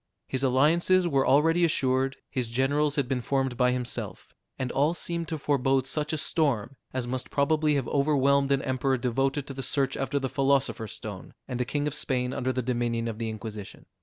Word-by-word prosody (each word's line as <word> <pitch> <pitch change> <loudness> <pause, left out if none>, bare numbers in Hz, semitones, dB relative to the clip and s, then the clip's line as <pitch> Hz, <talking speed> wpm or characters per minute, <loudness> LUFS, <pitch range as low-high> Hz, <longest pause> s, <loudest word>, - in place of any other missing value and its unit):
His 130 - -2
alliances 165 +8 +3
were 135 -5 +2
already 165 +5 +4
assured, 135 -4 +1
his 125 -3 -2
generals 140 +4 +1
had 140 -4 0
been 130 -1 -1
formed 135 0 0
by 125 +1 +3
himself, 125 -1 -4 0.2
and 130 -1 -2
all 150 +5 +2
seemed 170 -1 -2
to 160 - -3
forebode 135 -2 +1
such 150 +2 -2
a 155 - -1
storm 140 -7 0 0.2
as 130 -2 -2
must 130 +1 -4
probably 150 +1 +2
have 135 -4 -1
overwhelmed 140 -1 +2
an 140 -1 +2
emperor 130 0 0
devoted 135 +3 0
to 140 - -7
the 135 - -5
search 135 +1 0
after 135 +1 -1
the 135 -1 -1
philosopher's 135 -5 0
stone, - - -8
and 125 0 -3
a - - 0
king 145 +3 -1
of 150 - -1
Spain 130 -3 -1
under 130 0 -1
the 130 0 -2
dominion 120 -1 -1
of 115 -1 -5
the 115 -1 -2
Inquisition. 110 -2 -8
135 Hz, 195 wpm, -27 LUFS, 125-145 Hz, 0.2 s, already